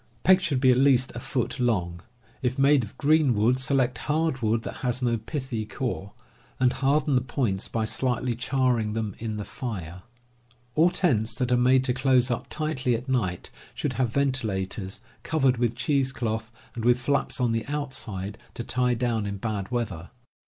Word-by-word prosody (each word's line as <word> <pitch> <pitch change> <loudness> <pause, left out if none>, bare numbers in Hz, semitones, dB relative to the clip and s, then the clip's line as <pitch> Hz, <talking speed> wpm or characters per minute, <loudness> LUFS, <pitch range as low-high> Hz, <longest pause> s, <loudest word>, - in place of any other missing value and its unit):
Pegs 190 +1 +6
should 145 -7 +1
be 130 -1 +5
at 125 - +3
least 130 -2 +4
a - - -5
foot 125 +1 -2
long. 90 -8 0 0.4
If 130 0 -1
made 140 -1 +4
of 105 - -10
green 150 -4 +3
wood, 115 +5 +3
select 130 -2 +1
hard 155 -3 0
wood 110 0 +1
that - - -6
has 125 0 -1
no 120 -1 +2
pithy 130 -2 -4
core, 110 -3 -4 0.5
and 125 -1 +3
harden 140 +2 +1
the 125 - +3
points 120 -6 -1
by 115 -1 -1
slightly 125 +1 -1
charring 125 -3 0
them 110 -3 -3
in 110 -1 -4
the 105 - -4
fire. 95 - -6 0.7
AH 165 +3 +5
tents 120 - +1
that 125 -2 -1
are - - +5
made 130 +1 +4
to 130 -1 +1
close 130 -1 +3
up 120 - -2
tightly 145 -6 -1
at 120 +4 -5
night 105 -9 -1 0.2
should - - -2
have 130 -3 0
ventilators, 110 -7 -1 0.2
covered 135 -6 +2
with 120 -1 0
cheese 135 +2 +1
cloth, 110 -3 -3 0.2
and 115 - -5
with 120 +1 +4
flaps 140 +3 0
on 125 -2 +2
the 115 -1 0
outside 110 -9 -4 0.2
to 120 - -4
tie 125 0 +1
down 115 -3 -1
in 100 0 -4
bad 100 -2 -3
weather. 110 -9 -3
125 Hz, 180 wpm, -26 LUFS, 110-135 Hz, 0.7 s, Pegs